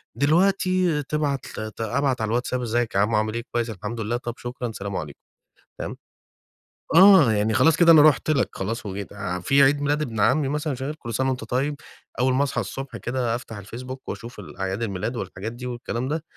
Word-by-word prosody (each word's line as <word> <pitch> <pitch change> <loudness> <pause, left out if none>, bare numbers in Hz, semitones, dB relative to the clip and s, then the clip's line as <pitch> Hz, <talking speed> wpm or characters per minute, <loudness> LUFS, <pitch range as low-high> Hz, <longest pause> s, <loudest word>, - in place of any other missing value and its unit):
دلوقتي، 180 - +2
تبعت 145 -2 -1
ل 110 0 -5
أبعت 130 +2 0
على 110 - 0
الواتساب: 125 +2 -1
"إزيِّك 120 -2 -1
يا - - +3
عمو 105 +2 +2
عامِل 110 0 0
إيه؟" 115 +1 -3
"كويِّس 120 -1 -1
الحمد 110 +2 -5
لله." 115 +3 -1
"طَب 120 -1 -5
شكرًا، 120 -1 -5
سلام 100 -2 -5
عليكم"، 75 -4 -6 0.6
تمام؟ - - -5 1.0
آه، 185 - +8
يعني 105 +1 +1
خلاص 160 +7 +4
كده 170 -1 +7
أنا 160 -2 +9
رُحت 155 0 +4
لك، 140 -4 +1
خلاص 115 +4 -4
وجيت 100 0 -5
آآ، 90 -3 -4
في 135 +10 +4
عيد 145 +1 +3
ميلاد 145 +1 +1
ابن 115 -7 -3
عمي 130 +8 +3
مثلًا، 150 0 -1
مش 130 - -7
عارف 150 +3 -3
"كل 115 -1 -6
سنة 130 +4 +1
وأنتَ 130 -1 -2
طيِّب."، 140 +4 -1 0.4
أول 130 +1 +3
ما 135 +2 +3
أصحى 140 - -1
الصبح 135 0 -6
كده، 120 -2 -1
أفتَح 115 -3 -7
الفيسبوك 125 +6 -8
وأشوف 120 +2 -7
الأعياد 95 +3 -4
الميلاد 100 +3 -3
والحاجات 100 0 -5
دي 120 +1 -8
والكلام 120 0 -4
ده، 155 +2 -2
125 Hz, 200 wpm, -24 LUFS, 110-140 Hz, 1.0 s, أنا